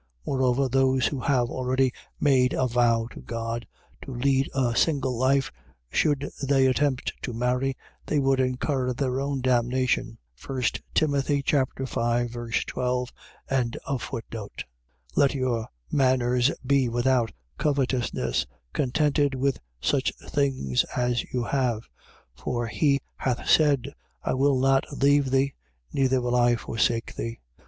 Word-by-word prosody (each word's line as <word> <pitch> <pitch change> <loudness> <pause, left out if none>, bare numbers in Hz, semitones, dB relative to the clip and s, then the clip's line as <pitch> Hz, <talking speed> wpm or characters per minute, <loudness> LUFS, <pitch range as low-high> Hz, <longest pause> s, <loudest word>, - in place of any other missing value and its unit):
Moreover, 130 0 +1
those 130 0 +2
who 140 - -1
have 125 -2 +1
already 130 0 +1 0.3
made 130 -3 +3
a 130 - +1
vow 115 -2 +2
to - - -10
God 115 -1 -4 0.3
to - - -8
lead 135 +2 +1
a 125 -3 +1
single 135 -5 +1
life, 135 +3 +2 0.4
should 145 - +1
they 135 -1 +3
attempt 130 0 +1
to 125 - -4
marry, 125 +3 0 0.3
they 150 - +1
would 135 -1 +2
incur 130 0 0
their 130 0 -1
own 140 -1 -2
damnation. 125 0 +1 0.3
1 130 -1 -4 0.3
Tim. 155 -2 +3
5. - - -9 0.2
12. 135 -3 +3 0.2
13:5. 120 0 -3 0.5
Let 140 0 +3
your 125 -4 -1 0.2
manners 125 -2 +3 0.2
be 135 -2 +3
without 120 -1 +2 0.3
covetousness, 125 - 0 0.3
contented 145 +1 +1
with 135 0 0 0.2
such - - +1
things 130 - 0
as 125 -1 0
you 125 -1 -1
have. 120 -4 -1 0.5
For 120 - -3
he 140 +4 +1 0.2
hath 125 -2 -2
said: 145 -5 +3 0.3
I - - 0
will 135 0 +3
not 135 +1 +3
leave 140 -1 +3
thee: 135 +1 +2 0.4
neither 130 -2 +2
will 120 0 0
I 120 -1 +4
forsake 115 0 -1
thee. 115 0 -4
130 Hz, 125 wpm, -26 LUFS, 120-135 Hz, 0.5 s, I